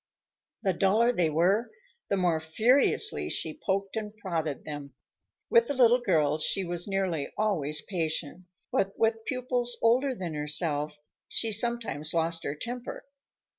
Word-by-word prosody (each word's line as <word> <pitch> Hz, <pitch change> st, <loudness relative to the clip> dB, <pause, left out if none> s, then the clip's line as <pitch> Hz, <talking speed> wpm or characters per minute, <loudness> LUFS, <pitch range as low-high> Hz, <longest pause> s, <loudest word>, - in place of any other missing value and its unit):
The 190 Hz, -3 st, +2 dB
duller 210 Hz, +7 st, +3 dB
they 175 Hz, -9 st, +1 dB
were, 185 Hz, +9 st, +2 dB, 0.4 s
the 200 Hz, -, +1 dB
more 175 Hz, -4 st, +1 dB
furiously 240 Hz, -, +3 dB
she -, -, -2 dB
poked 195 Hz, +1 st, -1 dB
and 215 Hz, -1 st, -5 dB
prodded 165 Hz, -8 st, -3 dB
them. 145 Hz, -3 st, -7 dB, 0.6 s
With 235 Hz, 0 st, +5 dB
the 285 Hz, -, -2 dB
little 245 Hz, -1 st, +5 dB
girls 155 Hz, -7 st, +2 dB
she 195 Hz, -, +2 dB
was 175 Hz, 0 st, -1 dB
nearly 190 Hz, -7 st, -1 dB
always 155 Hz, -9 st, 0 dB
patient, 170 Hz, -1 st, -3 dB, 0.3 s
but 195 Hz, 0 st, 0 dB
with 225 Hz, 0 st, +1 dB
pupils 250 Hz, -2 st, -1 dB
older 255 Hz, +4 st, +2 dB
than 180 Hz, -6 st, -5 dB
herself, 150 Hz, 0 st, -1 dB, 0.3 s
she 225 Hz, -, -1 dB
sometimes 225 Hz, -, 0 dB
lost 165 Hz, 0 st, -1 dB
her 145 Hz, -, -2 dB
temper. 245 Hz, +8 st, -6 dB
190 Hz, 140 wpm, -28 LUFS, 160-230 Hz, 0.6 s, With